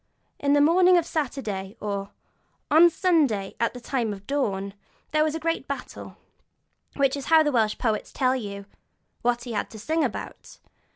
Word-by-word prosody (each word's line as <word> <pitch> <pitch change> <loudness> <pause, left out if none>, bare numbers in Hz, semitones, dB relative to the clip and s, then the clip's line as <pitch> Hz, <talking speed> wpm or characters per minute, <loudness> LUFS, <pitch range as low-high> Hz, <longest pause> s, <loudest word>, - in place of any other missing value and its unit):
'In 280 0 +2
the 290 - +5
morning 360 +4 +5
of 340 - +1
Saturday,' 235 - -4
or 200 -1 -4 0.6
'On 330 +3 +8
Sunday, 295 - +1
at 230 +1 0
the - - -6
time 235 -3 -2
of 195 0 -11
dawn, 200 -8 -2 0.4
there 305 0 +3
was 310 0 -1
a - - -3
great 330 -3 -2
battle'; 280 -2 -7 0.8
that 275 -1 +2
is 280 -2 -6
how 320 0 +6
the 295 - +1
Welsh 220 -4 +1
poet 220 -4 -1
tells 260 -1 +1
you 200 -1 -7 0.6
what 240 0 0
he 245 - -7
had 210 - -2
to 220 - -11
sing 315 +9 0
about. 250 - -6
260 Hz, 175 wpm, -25 LUFS, 215-310 Hz, 0.8 s, On